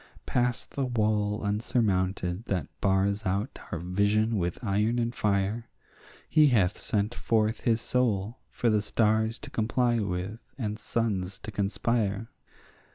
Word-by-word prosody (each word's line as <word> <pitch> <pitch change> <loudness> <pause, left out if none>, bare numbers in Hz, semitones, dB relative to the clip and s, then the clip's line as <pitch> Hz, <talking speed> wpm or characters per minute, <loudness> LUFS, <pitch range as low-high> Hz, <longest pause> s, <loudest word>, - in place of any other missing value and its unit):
Past 125 -1 0
the 140 - -2
wall 105 -3 +1
unsurmounted 100 -3 0
that 90 - -1 0.2
bars 100 +2 +2
out 100 +6 -2
our - - -1
vision 100 +6 +1
with 85 -1 -1
iron 105 +3 +1
and 120 0 0
fire 105 +2 0 0.6
He 155 -2 +5
hath 105 -8 +2
sent 105 +2 -1
forth 110 -1 +1
his 115 -2 +2
soul 115 -3 0
for 120 - +1
the 105 -1 +3
stars 110 +1 +1
to - - -10
comply 120 +2 +1
with 100 +2 -3 0.2
and 105 -4 -3
suns 100 -5 -1
to 110 - -6
conspire. 100 +2 0
105 Hz, 135 wpm, -28 LUFS, 100-115 Hz, 0.6 s, He